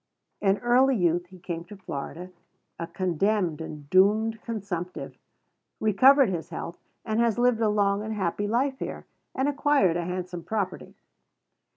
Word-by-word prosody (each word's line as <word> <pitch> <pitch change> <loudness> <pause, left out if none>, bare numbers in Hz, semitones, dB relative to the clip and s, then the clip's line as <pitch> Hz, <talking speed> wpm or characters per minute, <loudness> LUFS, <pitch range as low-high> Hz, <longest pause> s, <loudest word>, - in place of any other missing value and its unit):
In 195 -1 +3
early 255 +3 +3
youth 175 -3 +1
he 185 +1 -14
came 170 -1 -5
to 205 +3 -11
Florida 175 +1 -6 0.5
a 165 - -3
condemned 180 -1 0
and 150 -2 -8
doomed 215 +4 +3
consumptive, 195 -6 -5 0.6
recovered 255 +5 +5
his 175 -2 -4
health, 170 0 -6 0.3
and 220 0 0
has 235 -2 +2
lived 240 -2 +3
a 220 - +3
long 200 -1 +2
and 220 +1 -4
happy 205 +1 -1
life 265 +5 0
here, - - -5 0.3
and 265 +2 +1
acquired 285 - +2
a 175 - -2
handsome 180 -1 -4
property. 205 -4 -3
200 Hz, 150 wpm, -26 LUFS, 175-225 Hz, 0.6 s, recovered